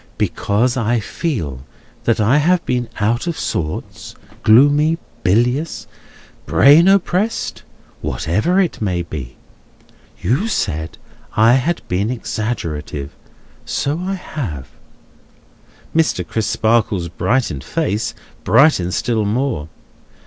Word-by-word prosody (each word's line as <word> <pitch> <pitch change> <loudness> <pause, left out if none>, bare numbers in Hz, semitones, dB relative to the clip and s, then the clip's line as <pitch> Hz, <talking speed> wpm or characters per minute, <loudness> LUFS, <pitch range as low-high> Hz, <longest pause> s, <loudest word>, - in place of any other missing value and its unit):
Because 120 +5 0
I 120 0 +1
feel 90 - -3 0.4
that 115 - +2
I 110 +7 +4
have 175 +3 +2
been 125 -2 -1
out 115 +8 0
of 170 - -2
sorts, 75 -2 -4 0.3
gloomy, 145 +8 +5 0.2
bilious, 125 - +1 0.6
brain 150 +6 +6
oppressed, 195 +3 +1 0.4
whatever 105 - 0
it 180 -10 0
may 90 -4 0
be. 70 -7 -7 0.8
You 130 - 0
said 80 - -2 0.4
I 115 +2 +6
had 155 +7 0
been 95 +4 0
exaggerative. 80 - -4 0.5
So 145 +4 -2
I 190 +2 -2
have." 110 - -6 1.3
Mr. 155 - +1
Crisparkle's 110 -3 +1
brightened 90 - -1
face 115 - -2 0.3
brightens 110 - +4
still 115 -2 0
more. 105 - -1
115 Hz, 100 wpm, -18 LUFS, 90-150 Hz, 1.3 s, brain